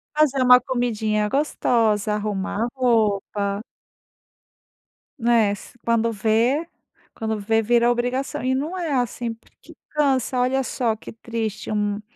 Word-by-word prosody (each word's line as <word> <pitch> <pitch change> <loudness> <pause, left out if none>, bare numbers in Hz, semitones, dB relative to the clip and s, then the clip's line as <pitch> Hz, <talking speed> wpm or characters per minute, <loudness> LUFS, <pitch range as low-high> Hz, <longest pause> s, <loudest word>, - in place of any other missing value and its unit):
Fazer 290 -3 +3
uma 250 0 +8
comidinha 220 -4 -1
gostosa, 225 -6 +1
arrumar 210 0 -2
a - - 0
roupa. 210 -4 +1 1.6
Né, 230 -3 +3
se 205 +4 -11
quando 230 0 +1
vê 230 +9 +1 0.5
quando 220 -1 -3
vê 225 +2 +1
vira 235 +2 +3
obrigação, 255 +5 -2
e 260 +1 0
não 310 +8 -3
é 330 -5 -2
assim, 245 -2 -1
porque 225 - -19
cansa. 270 -4 +1
Olha 260 +2 +1
só 240 -4 -1
que 220 - -11
triste 225 -2 -5
um 210 -1 -1
230 Hz, 130 wpm, -23 LUFS, 215-255 Hz, 1.6 s, uma